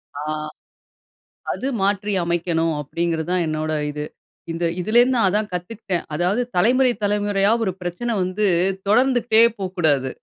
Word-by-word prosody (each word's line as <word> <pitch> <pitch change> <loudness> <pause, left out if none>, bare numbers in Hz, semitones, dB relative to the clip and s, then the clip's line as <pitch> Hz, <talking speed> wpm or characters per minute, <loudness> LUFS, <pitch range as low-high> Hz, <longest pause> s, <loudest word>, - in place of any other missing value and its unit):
ஆ. 145 - -5 1.3
அது 265 - -3
மாற்றி 200 +1 0
அமைக்கணும் 170 -1 0
அப்பிடிங்கிறது 165 +2 -2
தான் 180 -2 +1
என்னோட 155 0 -2 0.2
இது. 150 0 -5 0.5
இந்த 165 +1 -3 0.2
இதுல 215 +6 +2
இருந்து 250 +1 +3
நான் 225 -5 +3
அதான் 210 +2 -1
கத்துக்கிட்டேன். 180 0 -3
அதாவது 180 +8 +1 0.2
தலைமுறை, 250 +7 +4
தலைமுறையா 205 0 +1
ஒரு 190 - -1
பிரச்சன 180 +7 -3
வந்து 185 +3 0 0.4
தொடர்ந்துகிட்டே 235 0 +4 0.2
போ 195 - -3
கூடாது. 145 -6 +2
190 Hz, 135 wpm, -21 LUFS, 170-215 Hz, 1.3 s, தலைமுறை